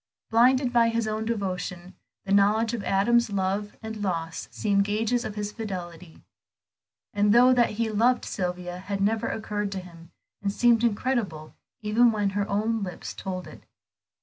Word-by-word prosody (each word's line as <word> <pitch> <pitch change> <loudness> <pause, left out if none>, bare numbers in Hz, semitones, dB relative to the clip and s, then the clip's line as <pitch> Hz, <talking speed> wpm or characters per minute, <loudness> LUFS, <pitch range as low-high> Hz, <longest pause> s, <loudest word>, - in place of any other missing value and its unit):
Blinded 250 +2 +4
by 230 -1 +4
his 230 -1 -1
own 215 +1 -2
devotion, 185 -4 -4 0.3
the 195 - -4
knowledge 210 +3 +3
of 225 -4 -3
Adam's 235 +5 +2
love 200 +1 -1
and 220 -1 -6
loss 165 -4 -3
seemed 200 -2 +1
gages 220 +4 0
of 210 - -5
his 210 -1 -3
fidelity; 180 -6 -7 0.9
the 205 0 +2
thought 250 +3 +6
that 240 -1 +4
he 225 +2 -1
loved 235 +4 +2
Sylvia 180 -1 -4 0.2
never 220 +3 +1
had - - -2
occurred 210 -2 -3
to 190 - -3
him, 170 -2 -13 0.3
and 200 -1 -1
seemed 235 +1 +3
incredible 210 -9 -1 0.3
even 230 +3 +4
when 205 -2 0
her 200 0 -2
own 220 +2 0
lips 185 -3 -6
told 185 -2 -5
it. - - -12
210 Hz, 160 wpm, -26 LUFS, 190-230 Hz, 0.9 s, thought